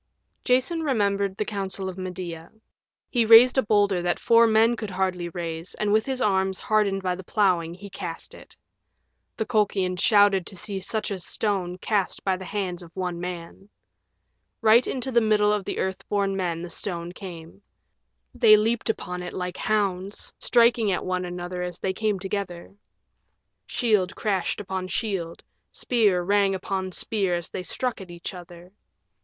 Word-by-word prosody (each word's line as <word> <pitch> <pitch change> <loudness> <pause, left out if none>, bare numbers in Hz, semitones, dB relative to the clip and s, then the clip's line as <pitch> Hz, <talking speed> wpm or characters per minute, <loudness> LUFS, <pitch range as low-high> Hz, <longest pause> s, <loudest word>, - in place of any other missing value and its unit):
Jason 260 +7 +2
remembered 200 -8 0
the 210 - -1
counsel 195 -2 -3
of 185 - -5
Medea. 180 -3 -6 0.6
He 240 -2 +3
raised 230 +4 +8
a - - +5
boulder 205 -4 +2
that 175 0 0
four 230 0 +5
men 225 +2 +4
could 215 -2 -5
hardly 185 -2 -1
raise 170 -1 -5
and 210 -1 0
with 220 +3 +2
arms 190 -5 +1
hardened 200 -3 +1
by 180 -1 0
the 185 +1 -7
plowing 175 -4 +1
he 200 +2 -10
cast 175 -3 -6
it. - - -15 0.8
The 220 - -1
Colchians 195 -5 0
shouted 205 -3 +4
to 190 - -10
see 200 0 -4
such 215 +2 -3
a 195 - -3
stone 180 -1 -1
cast 200 0 -1
by 190 -1 +1
the 185 0 -8
hands 185 -4 -3
of 170 - -11
one 180 -2 -3
man. 180 +2 -7 0.9
Right 225 +2 +5
into 265 0 -3
the 235 -1 +4
middle 210 -1 +3
of 205 -2 -2
the - - -4
Earth 190 +1 -2
born 200 -1 0
Men 175 -3 -2
the 175 - -7
stone 175 -3 -4
came. 175 -1 -10 0.7
They 215 -2 +7
leaped 225 +2 0
upon 180 -4 -3
it 180 - -6
like 180 0 -4
hounds, 200 -2 -2
striking 235 -3 +3
at 180 - -2
one 185 0 -1
another 180 0 -5
as 180 -1 -4
they 190 - -2
came 215 0 0
together. 190 -2 -5 0.9
Shield 210 -7 +1
crashed 200 -1 -1
on 190 -1 -3
shield, 185 -5 -3 0.3
spear 210 -7 +1
rang 200 +1 +2
upon 190 0 -3
spear 195 -1 0
as 175 0 -5
they 185 - -4
struck 245 +5 -3
at 185 - -10
each 175 +1 -7
other. 175 0 -12
195 Hz, 165 wpm, -25 LUFS, 180-215 Hz, 0.9 s, raised